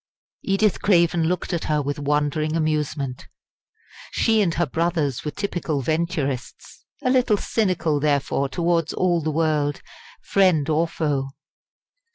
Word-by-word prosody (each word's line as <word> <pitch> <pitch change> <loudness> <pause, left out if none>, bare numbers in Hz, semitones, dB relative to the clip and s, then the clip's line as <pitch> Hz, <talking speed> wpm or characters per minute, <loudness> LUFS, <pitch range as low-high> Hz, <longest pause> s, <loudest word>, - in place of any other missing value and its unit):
Edith 195 +1 +1
Craven 170 -3 +3
looked 180 +2 -1
at 170 - -2
her 150 -1 +1
with 145 0 -3
wondering 150 +2 0
amusement. 150 -4 -2 0.8
She 220 -1 +2
and 185 -5 +2
her 170 - +1
brothers 160 -3 -1
were 150 - -2
typical 160 -4 -3
Venturists 155 -4 -3 0.2
a 255 - +2
little 250 -5 +3
cynical, 180 -9 0
therefore, 140 -1 0
towards 170 -1 0
all 175 -2 +1
the 155 - -2
world, 150 -2 0 0.4
friend 180 -7 +3
or 160 +2 +2
foe. 145 -5 -2
160 Hz, 130 wpm, -23 LUFS, 145-175 Hz, 0.8 s, Craven